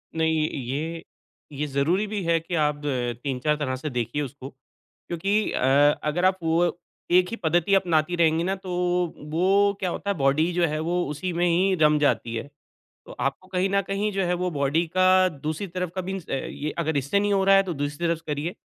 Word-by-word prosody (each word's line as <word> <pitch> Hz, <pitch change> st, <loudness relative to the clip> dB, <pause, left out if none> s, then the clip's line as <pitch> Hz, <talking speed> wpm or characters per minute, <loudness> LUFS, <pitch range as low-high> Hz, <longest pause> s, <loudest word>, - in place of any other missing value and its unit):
नहीं, 160 Hz, -1 st, +1 dB
ये, 150 Hz, +6 st, -4 dB, 0.5 s
ये 150 Hz, +1 st, -3 dB
ज़रूरी 150 Hz, +9 st, +1 dB
भी 205 Hz, -1 st, -3 dB
है 165 Hz, -1 st, +2 dB
कि 165 Hz, +2 st, -5 dB
आप 150 Hz, 0 st, -2 dB, 0.4 s
3-4 140 Hz, +2 st, 0 dB
तरह 135 Hz, -3 st, -2 dB
से 130 Hz, +4 st, -5 dB
देखिए 125 Hz, +3 st, -2 dB
उसको 135 Hz, -1 st, -7 dB
क्योंकि 175 Hz, +9 st, -4 dB
अ, 140 Hz, +3 st, +4 dB
अगर 155 Hz, +4 st, 0 dB
आप 185 Hz, 0 st, +3 dB
वो 170 Hz, +1 st, +1 dB, 0.3 s
एक 180 Hz, 0 st, +4 dB
ही -, -, -2 dB
पद्धति 170 Hz, +4 st, +2 dB
अपनाती 175 Hz, -3 st, +1 dB
रहेंगी 165 Hz, -1 st, +2 dB
ना, 190 Hz, +2 st, 0 dB
तो 190 Hz, -1 st, -10 dB, 0.5 s
वो -, -, -12 dB
वो 195 Hz, +4 st, +3 dB
क्या 185 Hz, -, -1 dB
होता 200 Hz, -, -4 dB
है, 200 Hz, -, +1 dB
बॉडी 145 Hz, +4 st, +2 dB
जो 175 Hz, 0 st, +2 dB
है 155 Hz, 0 st, -2 dB
वो 175 Hz, 0 st, +1 dB
उसी 165 Hz, +5 st, -3 dB
में 175 Hz, -, +3 dB
ही 185 Hz, +3 st, +2 dB
रम 150 Hz, 0 st, +5 dB
जाती 120 Hz, -5 st, +1 dB
है। 115 Hz, +5 st, -5 dB, 0.6 s
तो -, -, -10 dB
आपको 140 Hz, +7 st, -2 dB
कहीं 185 Hz, 0 st, 0 dB
न 200 Hz, 0 st, +3 dB
कहीं 200 Hz, +2 st, 0 dB
जो 195 Hz, 0 st, 0 dB
है 175 Hz, 0 st, +1 dB
वो 180 Hz, +1 st, -1 dB
बॉडी 145 Hz, +2 st, 0 dB
का 185 Hz, 0 st, +5 dB, 0.2 s
दूसरी 155 Hz, +3 st, -4 dB
तरफ 180 Hz, -1 st, -4 dB
का 185 Hz, -, -1 dB
मीन्स 190 Hz, -2 st, -5 dB
अ -, -, -5 dB
अ, -, -, +1 dB
ये 145 Hz, +3 st, -4 dB
अगर 160 Hz, -2 st, 0 dB
इससे 140 Hz, +8 st, +1 dB
नहीं 205 Hz, 0 st, +1 dB
हो 195 Hz, -1 st, +2 dB
रहा 195 Hz, 0 st, +6 dB
है, 195 Hz, -, +5 dB
तो 185 Hz, -3 st, -4 dB
दूसरी 145 Hz, +3 st, -3 dB
तरफ 165 Hz, -1 st, 0 dB
स -, -, -21 dB
करिए। 150 Hz, +3 st, -3 dB
165 Hz, 220 wpm, -25 LUFS, 145-185 Hz, 0.6 s, रहा